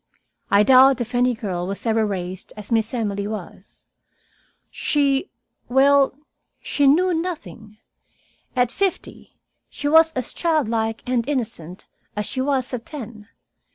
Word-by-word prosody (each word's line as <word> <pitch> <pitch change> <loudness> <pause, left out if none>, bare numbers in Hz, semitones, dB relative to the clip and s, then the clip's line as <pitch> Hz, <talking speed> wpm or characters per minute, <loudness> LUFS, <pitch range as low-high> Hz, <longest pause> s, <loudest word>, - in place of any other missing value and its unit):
I 200 +1 +5
doubt 260 +2 +6
if 240 +1 -4
any 245 0 +2
girl 185 -6 -4
was 195 +4 -5
ever 225 -1 +2
raised 185 -3 -5
as 210 +1 -9
Miss 225 -1 +1
Emily 205 -4 -2
was. 205 -2 -9 0.9
She 285 +3 0 0.4
well, 275 +1 +4 0.4
she 285 -1 +1
knew 355 +6 +4
nothing. 315 - -5 0.8
At 245 -1 +2
fifty 390 -2 -3 0.3
she 290 - -4
was 320 +2 +6
as 255 -2 -3
childlike 230 -9 0
and 245 0 -1
innocent 205 - -4 0.3
as 210 0 -2
she 260 - -3
was 265 -2 -1
at 240 -2 -4
ten. 230 -8 -9
245 Hz, 130 wpm, -22 LUFS, 210-280 Hz, 0.9 s, doubt